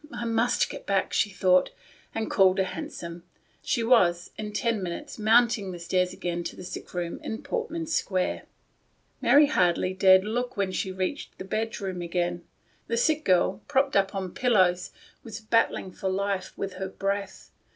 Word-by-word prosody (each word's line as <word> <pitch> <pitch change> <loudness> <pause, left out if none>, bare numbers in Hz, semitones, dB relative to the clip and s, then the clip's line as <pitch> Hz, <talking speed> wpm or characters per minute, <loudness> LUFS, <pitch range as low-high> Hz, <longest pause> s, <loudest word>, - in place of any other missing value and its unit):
I 235 - -5
must 230 +1 +1
get - - -9
back," 195 -1 0
she 210 - +2
thought, 185 -2 +3 0.5
and 225 -1 -1
calling 190 -1 +4
a - - +4
hansom, 170 -2 -6 0.4
she 235 - 0
was, 180 -8 +3
in 210 -1 -5
ten 230 0 0
minutes, 190 - -6
mounting 220 -2 +3
the 175 - -7
stairs 180 +1 0
again 175 -1 -3
to - - -5
the - - -9
sick 180 - -8
room 175 -1 -3
in 220 - -5
Portman 455 -9 -3
Square. 190 - -1 0.8
Mary 295 +1 +6
hardly 185 - +1
dared 190 0 +6
look 245 +3 -3
when 195 -2 0
she 190 0 -2
reached 185 +9 -4
the 190 - -7
bedroom 200 -3 -3
again. 175 0 -2 0.4
The 230 - -1
sick 310 +5 +2
girl, 180 -2 +2
propped 275 -1 +1
up 195 +1 +2
on 190 -2 -4
pillows, 185 -7 +2 0.3
was 220 -2 -7
battling 220 -3 +1
for 190 - -3
life 195 0 -2
with 195 -1 -4
her 190 - -2
breath. 200 +1 -4
195 Hz, 170 wpm, -27 LUFS, 185-230 Hz, 0.8 s, Mary